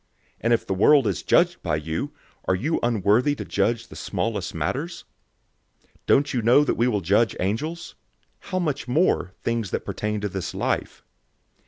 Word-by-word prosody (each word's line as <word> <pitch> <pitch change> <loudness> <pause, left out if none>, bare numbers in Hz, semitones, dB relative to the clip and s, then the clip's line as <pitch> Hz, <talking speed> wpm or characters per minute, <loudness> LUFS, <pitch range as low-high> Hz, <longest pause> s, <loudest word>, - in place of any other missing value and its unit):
And 115 - 0
if 115 - +2
the - - -1
world 135 +8 +5
is 95 -8 -1
judged - - +3
by 75 - 0
you, 80 +1 -3 0.3
are 95 - +2
you 145 - -1
unworthy 120 +4 +2
to - - -6
judge 115 +3 0
the - - -11
smallest 105 -7 -3
matters? 135 - -3 0.8
006:003 - - -34 0.2
Don't 145 +1 +3
you 125 - 0
know 120 +6 +5
that - - +1
we 120 - +1
will 105 -5 0
judge 100 +6 +2
angels? 150 - -3 0.6
How 185 - -1
much 150 -7 -2
more, 125 - +1
things 115 -4 -1
that - - -3
pertain 105 0 -2
to 105 - -1
this 95 -2 -5
life? - - -2
115 Hz, 175 wpm, -24 LUFS, 95-140 Hz, 0.8 s, world